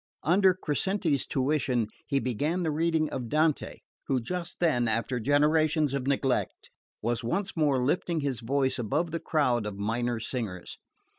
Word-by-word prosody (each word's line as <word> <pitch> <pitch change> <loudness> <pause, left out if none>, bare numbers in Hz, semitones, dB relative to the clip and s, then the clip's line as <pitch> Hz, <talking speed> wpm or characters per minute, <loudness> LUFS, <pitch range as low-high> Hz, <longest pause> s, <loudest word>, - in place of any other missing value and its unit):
Under 185 +3 +4
Crescenti's 170 - 0
tuition 130 -4 0 0.2
he 140 - +1
began 145 +9 -1
the 160 - 0
reading 160 0 +1
of 120 -3 -4
Dante, 155 +1 +1 0.3
who 130 - +1
just 175 +8 -4
then, 125 -9 +2
after 115 +3 0
generations 150 +2 +2
of 135 -1 -2
neglect, 135 -2 -1 0.3
was 120 +1 -1
once 195 - -2
more 145 -6 +2
lifting 165 +2 0
his 140 -4 -2
voice 130 +2 0
above 150 +9 -1
the 165 - -2
crowd 125 -10 +1
of 100 -2 -6
minor 115 +3 -1
singers. 110 -7 -5
140 Hz, 150 wpm, -28 LUFS, 120-160 Hz, 0.3 s, Under